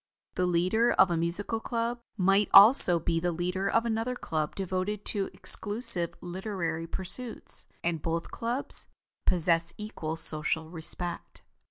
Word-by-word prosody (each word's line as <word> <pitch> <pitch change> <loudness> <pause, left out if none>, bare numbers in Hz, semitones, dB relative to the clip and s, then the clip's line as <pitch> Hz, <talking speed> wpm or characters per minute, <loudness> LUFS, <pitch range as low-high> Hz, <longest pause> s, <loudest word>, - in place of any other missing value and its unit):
The 180 0 -2
leader 185 +7 +1
of 190 -2 +3
a - - 0
musical 175 +7 -2
club 235 +1 -4 0.2
might 195 +2 +1
also 200 -4 +8
be 165 0 -2
the 175 +1 -2
leader 180 +3 -3
of 230 +1 0
another 230 +2 -3
club 155 -9 -4
devoted 195 +2 -4
to 200 -2 -3
exclusive 205 -5 +4
literary 175 -3 -5
pursuits; 220 +8 -5 0.2
and 165 -2 -3
both 165 0 -4
clubs 240 +4 0 0.4
possess 170 -1 +1
equal 165 -7 -6
social 160 0 0
respect. 175 +1 -2
180 Hz, 135 wpm, -27 LUFS, 170-215 Hz, 0.4 s, also